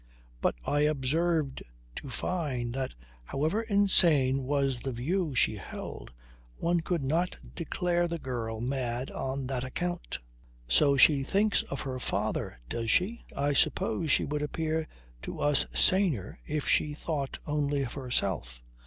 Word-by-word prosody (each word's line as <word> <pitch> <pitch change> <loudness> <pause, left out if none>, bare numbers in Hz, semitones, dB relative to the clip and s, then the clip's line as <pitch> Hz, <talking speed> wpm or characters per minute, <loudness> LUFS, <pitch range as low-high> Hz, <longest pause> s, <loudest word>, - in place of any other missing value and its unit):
But - - +2
I 145 - +1
observed 150 +1 +1 0.4
to 140 - -6
Fyne 130 -5 -2
that, 130 - -3 0.3
however 155 - 0
insane 170 - +4
was 135 -2 +1
the 135 - -3
view 150 +5 -1
she 110 - +3
held, - - -7 0.5
one 170 0 +1
could 165 -2 -1
not 165 +7 0 0.2
declare 175 +1 0
the 170 0 -3
girl 115 -6 -4
mad 125 0 -2
on 135 0 -3
that 130 -1 -2
account. 175 +7 -3 0.5
"So 140 - +4
she 140 0 +7
thinks 200 +7 +2
of 140 - -3
her 130 -1 -4
father 90 - -2
does 115 - -3
she? 215 - +2
I 145 +1 +1
suppose 140 +2 +1
she - - +4
would 150 +1 -2
appear 160 +1 -1 0.3
to - - -6
us 145 -1 +3
saner 185 - +2
if 150 -1 -2
she 150 -1 +2
thought 145 -3 -3
only 145 -2 0
of 120 - -5
herself." 95 - -2
140 Hz, 145 wpm, -29 LUFS, 130-165 Hz, 0.5 s, she